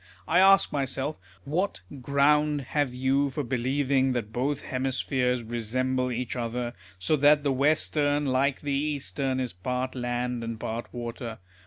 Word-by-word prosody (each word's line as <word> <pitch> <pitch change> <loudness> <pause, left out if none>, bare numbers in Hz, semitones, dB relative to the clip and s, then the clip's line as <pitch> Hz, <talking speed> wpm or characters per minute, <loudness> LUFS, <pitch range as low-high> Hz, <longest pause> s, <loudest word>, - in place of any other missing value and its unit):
I 175 - +4
ask 195 -2 +6
myself, 140 +1 -1 0.2
"What 160 - -1 0.2
ground 145 +2 +3
have 140 0 -1
you 135 +3 +1
for 145 +2 -3
believing 130 +1 +1
that 110 -3 -3
both 140 +3 -1
hemispheres 130 -1 -1
resemble 125 +3 -1
each 125 +1 -3
other, 120 0 -3 0.2
so 125 - +1
that 145 +1 +5
the 140 -2 +1
western, 145 +1 +2
like 135 +1 +1
the 145 -1 -2
eastern, 140 -2 -1
is 125 -5 -2
part 125 +8 -3
land 120 -1 -2
and 115 -1 -5
part 115 +2 -4
water 120 -1 -6
130 Hz, 145 wpm, -27 LUFS, 125-145 Hz, 0.2 s, ask